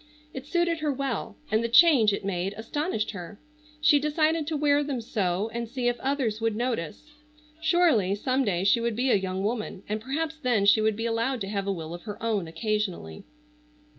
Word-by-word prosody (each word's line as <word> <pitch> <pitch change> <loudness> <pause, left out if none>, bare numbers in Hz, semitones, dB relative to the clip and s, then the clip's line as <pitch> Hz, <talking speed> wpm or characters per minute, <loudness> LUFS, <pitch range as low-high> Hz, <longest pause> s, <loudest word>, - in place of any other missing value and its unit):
It 265 0 -7
suited 345 0 +1
her 305 -1 0
well, 265 -5 -3
and 220 +1 +2
the 235 - -1
change 250 -5 +6
it 200 - -3
made 195 +1 -2
astonished 230 +1 -2
her. 200 0 -9 0.4
She 300 -1 +5
decided 310 +1 +1
to 320 -2 -1
wear 290 0 +3
them 280 -3 -3
so 205 -2 -1
and 235 -1 -4
see 250 0 -2
if 240 -1 0
others 260 -5 -1
would 225 -1 0
notice. 240 - -3 0.5
Surely, 320 - +3
some 255 +5 0
day 185 -6 0
she 215 +4 +3
would 235 -1 -1
be 255 +3 +1
a - - +5
young 190 -1 -2
woman, 210 -3 -3
and 215 +1 -3
perhaps 310 +6 -3
then 240 -7 +2
she 210 +2 +5
would 215 -1 +2
be 225 +2 -3
allowed 230 +3 0
to 195 - -3
have 200 -1 -2
a - - +1
will 165 -3 -5
of 175 - -8
her 210 -2 -6
own 210 -6 0
occasionally. 185 - -3
230 Hz, 200 wpm, -27 LUFS, 200-280 Hz, 0.5 s, change